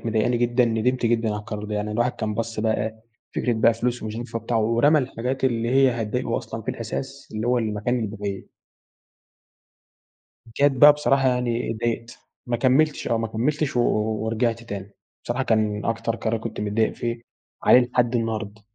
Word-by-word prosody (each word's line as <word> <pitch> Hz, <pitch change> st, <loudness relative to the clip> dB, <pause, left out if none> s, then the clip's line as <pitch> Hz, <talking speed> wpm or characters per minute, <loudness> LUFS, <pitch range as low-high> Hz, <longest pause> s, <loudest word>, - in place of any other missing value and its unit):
مضايقاني 115 Hz, +2 st, +1 dB
جدًا 120 Hz, +1 st, +2 dB
ندمت 120 Hz, +2 st, +1 dB
جدًا 115 Hz, -1 st, +1 dB
على 105 Hz, -, -1 dB
القرار 105 Hz, 0 st, -6 dB
ده، 105 Hz, 0 st, -4 dB
يعني 105 Hz, +1 st, -2 dB
الواحد 120 Hz, +3 st, +1 dB
كان 105 Hz, -1 st, -3 dB
بَص 115 Hz, -1 st, -3 dB
بقى 110 Hz, -1 st, +1 dB
إيه 110 Hz, 0 st, -8 dB, 0.3 s
فكرة 125 Hz, -, 0 dB
بقى 115 Hz, 0 st, +3 dB
فلوس 120 Hz, +1 st, -2 dB
ومش 110 Hz, 0 st, -5 dB
هينفع 120 Hz, -1 st, -4 dB
وبتاع 115 Hz, +1 st, -2 dB
ورمى 115 Hz, +8 st, +4 dB
الحاجات 130 Hz, 0 st, -2 dB
اللي 115 Hz, -2 st, +1 dB
هي 135 Hz, 0 st, +5 dB
هتضايقه 105 Hz, -1 st, -2 dB
أصلًا -, -, -7 dB
في -, -, -2 dB
الأساس 135 Hz, +1 st, -6 dB
اللي 110 Hz, +2 st, -2 dB
هو 125 Hz, 0 st, +3 dB
المكان 110 Hz, +2 st, -1 dB
البعيد. 100 Hz, -2 st, -5 dB, 2.0 s
جت 140 Hz, +6 st, +2 dB
بقى 145 Hz, +3 st, +8 dB
بصراحة 135 Hz, -2 st, +2 dB
يعني 125 Hz, -2 st, 0 dB
اتضايقت. 115 Hz, +1 st, -3 dB, 0.3 s
ما 120 Hz, -1 st, 0 dB
كملتش 135 Hz, +5 st, +2 dB
آه 115 Hz, -, +1 dB
ما 115 Hz, -, -1 dB
كملتش، 140 Hz, +6 st, -1 dB
و 120 Hz, -, +4 dB, 0.4 s
ورجعت 115 Hz, +1 st, 0 dB
تاني. 100 Hz, -3 st, -7 dB, 0.3 s
بصراحة 125 Hz, +3 st, -1 dB
كان 105 Hz, -3 st, +1 dB
أكتر 115 Hz, 0 st, -1 dB
قرار 115 Hz, 0 st, -1 dB
كنت 110 Hz, -2 st, -5 dB
متضايق 105 Hz, +2 st, +1 dB
فيه 120 Hz, -1 st, -3 dB, 0.4 s
وعليه 125 Hz, -, +7 dB
لحد 125 Hz, -1 st, +1 dB
النهارد. 110 Hz, -2 st, -3 dB
115 Hz, 175 wpm, -24 LUFS, 110-125 Hz, 2.0 s, بقى